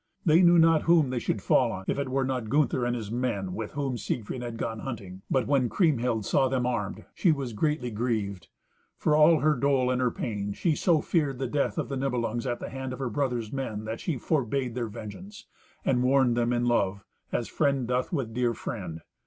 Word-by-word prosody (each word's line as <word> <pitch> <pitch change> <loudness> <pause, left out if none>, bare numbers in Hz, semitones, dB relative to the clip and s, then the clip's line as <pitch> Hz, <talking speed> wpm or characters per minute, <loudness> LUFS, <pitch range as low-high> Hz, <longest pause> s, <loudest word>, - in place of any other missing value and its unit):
They 165 +1 +6
knew 175 -1 +6
not 165 -1 +5
whom 160 -6 +5
they 125 - -1
should - - -2
fall - - +3
on, 95 0 -6
if - - 0
it 140 -2 -2
were 135 +1 +1
not 125 -4 -2
Gunther 140 -2 +2
and 120 - 0
his 110 -3 -5
men, 115 -7 -2
with 110 +1 -5
whom 135 -4 -2
Siegfried 120 +3 -3
had 120 -2 -5
gone 115 -1 -3
hunting. 100 -7 -7
But 130 -3 +2
when 135 -3 +2
Kriemhild 120 - +1
saw 135 - +3
them 130 -1 0
armed, 115 -6 -2
she 175 - +3
was 135 -6 -2
greatly 130 +1 -1
grieved. 105 -6 -2 0.5
For 150 - +2
all 155 +1 +6
her 155 +1 +4
dole 130 -1 +2
and 130 0 0
her 125 - +3
pain, 105 -4 -3
she 165 - +1
so 165 -2 +3
feared 145 -6 0
the 135 - -2
death 140 +3 -1
of - - -1
the 135 - -3
Nibelungs 120 -2 -1
at 120 -1 -2
the - - -6
hand 130 -1 -5
of - - -6
her 130 -3 -3
brother's 125 -4 -2
men 110 -6 -4
that 110 +1 -4
she 160 -6 -2
forbade 130 -3 -1
their 120 -1 -2
vengeance, 110 - -9 0.4
and 125 -2 +2
warned 130 -1 +3
them 120 0 +1
in 120 0 +1
love, 100 -5 +1 0.3
as 120 - -1
friend 140 -5 0
doth 125 +1 -1
with 130 -10 -2
dear 120 -1 +1
friend. 85 -7 -6
125 Hz, 220 wpm, -27 LUFS, 115-140 Hz, 0.5 s, They